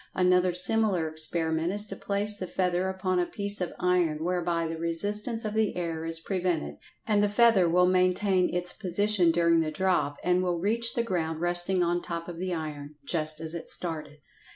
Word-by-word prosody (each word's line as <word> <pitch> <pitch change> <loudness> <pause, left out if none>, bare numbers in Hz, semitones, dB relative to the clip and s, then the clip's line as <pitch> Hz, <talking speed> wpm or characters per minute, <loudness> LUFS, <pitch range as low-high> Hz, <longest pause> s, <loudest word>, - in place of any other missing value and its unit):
Another 180 0 +3
similar 185 -1 +2
experiment 160 +1 -1
is 205 +1 +1
to 195 - -8
place 205 +2 0
the 185 -2 -6
feather 180 +1 0
upon 185 -1 -1
a 175 - 0
piece 205 -1 0
of 180 - -2
iron 175 -4 +1
whereby 175 -1 -1
the 165 0 -5
resistance 205 +7 -1
of 210 - -3
the 220 -1 0
air 165 -2 -3
is 165 0 +2
prevented, 175 - -2 0.3
and 210 -2 +2
the 205 - +2
feather 205 -4 +4
will 180 +2 +4
maintain 185 +1 +2
its 180 0 -1
position 200 -1 +1
during 170 0 +3
the 160 -1 0
drop, 155 -4 0
and 180 0 +2
will 180 -1 -1
reach 230 +6 +1
the 235 - +1
ground 160 -7 -2
resting 175 +2 +1
on 175 0 0
top 170 -1 -6
of 170 -1 -8
the 185 0 -3
iron, 150 -3 -6
just 155 -1 0
as 160 0 -4
it 170 - -6
started. 155 -4 -2
180 Hz, 190 wpm, -27 LUFS, 165-190 Hz, 0.3 s, feather